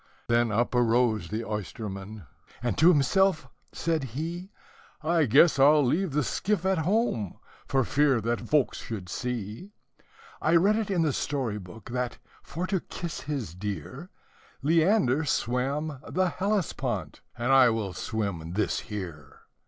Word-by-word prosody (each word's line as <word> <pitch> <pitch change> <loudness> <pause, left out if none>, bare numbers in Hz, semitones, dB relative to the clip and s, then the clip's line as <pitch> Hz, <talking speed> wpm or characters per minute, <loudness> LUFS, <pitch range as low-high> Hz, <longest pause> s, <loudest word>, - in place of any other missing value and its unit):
Then 120 -1 +3
up 120 +4 +1
arose 115 -5 +2
the 110 +6 -3
oysterman, 105 -1 -6 0.4
and 120 -5 0
to 165 - +6
himself 175 +1 +3 0.2
said 165 -3 -1
he, 170 +5 -4 0.5
"I 165 0 +3
guess 140 +6 +5
I 135 - +7
'll 150 -1 +6
leave 165 +5 0
the 150 0 +2
skiff 190 - -1
at 190 -2 +2
home, 165 - 0 0.3
for 135 -1 +2
fear 140 0 +2
that 115 +2 -1
folks 150 -4 +2
should 100 -6 -6
see 125 - -5 0.7
I 160 +2 +3
read 195 +6 +5
it 220 -2 -1
in 180 -4 +2
the 150 -3 +1
story 125 -8 -2
book, 95 +4 -11
that, 125 0 -2 0.2
for 175 +4 -4
to 190 0 0
kiss 170 0 -6
his 135 - -4
dear, 105 - -6 0.5
Leander 160 - +3
swam 140 +2 -1
the 185 0 +1
Hellespont, 140 - -2 0.2
and 120 +2 0
I 135 -2 +7
will 110 -5 -2
swim 90 -8 -3
this 105 +3 0
here." 90 -8 -8
130 Hz, 145 wpm, -27 LUFS, 110-165 Hz, 0.7 s, I